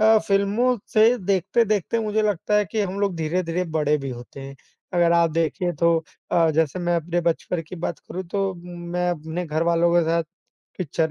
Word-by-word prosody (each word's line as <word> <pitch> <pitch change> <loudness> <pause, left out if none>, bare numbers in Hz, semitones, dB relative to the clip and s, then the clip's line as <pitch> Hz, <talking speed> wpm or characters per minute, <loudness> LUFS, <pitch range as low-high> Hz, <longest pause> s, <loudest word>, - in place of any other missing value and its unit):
अ, 220 0 +6
फ़िल्मों 205 +6 +1 0.2
से 225 +3 +5
देखते-देखते 200 +3 +1
मुझे 215 0 0
लगता 210 0 0
है 210 - +3
कि 215 +3 -3
हम 195 0 -2
लोग 200 -2 +1
धीरे-धीरे 165 +2 -1
बड़े 150 -1 +2
भी 140 - -5
होते 120 +3 -9
हैं, 135 0 -9 0.4
अगर 170 -1 +3
आप 170 -1 +4
देखिए 165 +2 0
तो 170 +1 +2 0.3
अ, 165 -2 +4
जैसे 155 +1 0
मैं 175 -1 +1
अपने 170 +1 -1
बचपन 170 0 -1
की 185 - -7
बात 170 -1 -4
करूँ 185 - -7
तो 195 +1 -1
मैं 175 0 -3
अपने 160 +2 -4
घरवालों 170 +2 +2
के 175 - +5
साथ 170 0 +2 0.6
पिक्चर 160 -2 -1
175 Hz, 185 wpm, -23 LUFS, 165-200 Hz, 0.6 s, अ